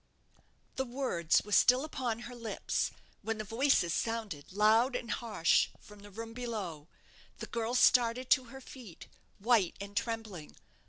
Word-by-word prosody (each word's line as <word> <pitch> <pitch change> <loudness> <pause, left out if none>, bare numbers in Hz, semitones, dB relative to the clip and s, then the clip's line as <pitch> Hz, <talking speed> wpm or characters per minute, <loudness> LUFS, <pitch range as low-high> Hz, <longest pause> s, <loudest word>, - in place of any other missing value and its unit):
The 265 - +1
words 240 - 0
were 210 - -10
still 250 +6 +5
upon 245 -6 -3
her 240 +1 -8
lips, 230 -2 -2 0.3
when 225 0 -3
the 215 - -4
voices 225 - +2
sounded 220 -11 -3
loud 220 +6 +3
and 235 -1 -4
harsh 210 -8 +2
from 210 -1 -15
the 205 0 -13
room 225 +3 -8
below. 205 -11 -5 0.5
The - - -6
girl 230 +1 -3
started 245 0 +3
to 260 - +5
her 265 +3 -11
feet, 235 -10 -12 0.3
white 210 -4 +2
and 200 0 -8
trembling. 225 -8 -4
225 Hz, 150 wpm, -32 LUFS, 205-245 Hz, 0.5 s, still